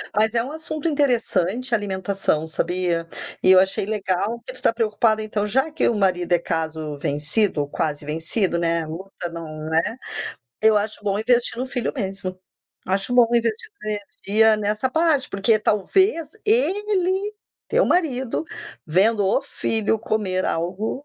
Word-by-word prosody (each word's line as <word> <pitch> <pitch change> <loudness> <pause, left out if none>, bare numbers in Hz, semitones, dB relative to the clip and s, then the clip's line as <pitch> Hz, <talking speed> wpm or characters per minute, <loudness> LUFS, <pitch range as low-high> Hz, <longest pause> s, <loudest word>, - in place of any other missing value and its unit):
Mas 215 +1 +2
é 230 - +2
um 265 - -6
assunto 310 0 -4
interessante, 250 - 0
alimentação, 190 -5 -1
sabia? 170 0 -1 0.4
E 185 - +6
eu 185 - +8
achei 190 +1 +2
legal 210 +2 -1
que - - -4
tu - - -11
tá - - +3
preocupada, 220 -1 +1
então, 215 -1 -2
já 265 +9 +1
que 310 - +2
o 235 - 0
marido 185 -3 0
é 175 - +4
caso 160 -2 -3
vencido 150 +6 +1
ou 145 - -3
quase 145 0 -2
vencido, 165 +5 0
né? 170 -1 +1
A - - -8
luta 175 +2 -7
não, 155 -2 -7
né 160 +1 +4 0.8
eu 220 0 +5
acho 210 +1 -1
bom 200 -1 0
investir 235 +2 +2
no 255 - -2
filho 255 -2 -2
mesmo. 195 -5 -3 0.5
Acho 195 +6 0
bom 245 -1 +6
investir 235 - +2 0.3
sua 215 - -3 0.4
energia 220 +1 +5
nessa 210 +4 -1
parte, 315 -2 +2
porque 215 +3 +2
talvez 325 - +1 0.2
ele, 410 -2 +1 0.3
teu - - +2
marido, 265 -6 0 0.4
vendo 200 +5 +3
o 190 - +2
filho 220 0 0
comer 205 -4 -1
algo, 195 - -2
210 Hz, 155 wpm, -22 LUFS, 180-245 Hz, 0.8 s, eu